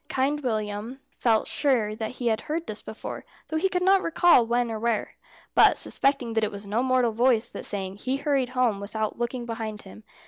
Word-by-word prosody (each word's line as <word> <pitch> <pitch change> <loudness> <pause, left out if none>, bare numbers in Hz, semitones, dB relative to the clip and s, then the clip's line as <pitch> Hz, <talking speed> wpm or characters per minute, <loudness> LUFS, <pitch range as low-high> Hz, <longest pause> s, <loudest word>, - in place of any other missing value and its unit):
Kind 280 +3 0
William 215 0 -3 0.2
felt 225 -3 +2
sure 240 -7 +1
that 220 +2 -4
he 255 - -6
had 220 - 0
heard 325 +2 -3
this 215 - -6
before, 220 - -7 0.3
though 315 - -1
he 380 +4 +1
could 360 -1 -1
not 385 +1 +5
recall 335 -5 +5
when 240 0 +1
or 220 - -3
where; 230 -1 -1 0.4
but - - +6
suspecting 270 -4 0
that 225 0 +1
it 215 - +1
was 200 0 -7
no 210 +4 0
mortal 255 -2 +2
voice 235 0 +2
that - - -6
sang, 195 -1 -3
he 260 +5 -2
hurried 275 -3 0
home 235 -5 +2
without 215 +2 -3
looking 240 0 -3
behind 225 -2 -5
him. 100 +3 -13
235 Hz, 205 wpm, -26 LUFS, 215-265 Hz, 0.4 s, but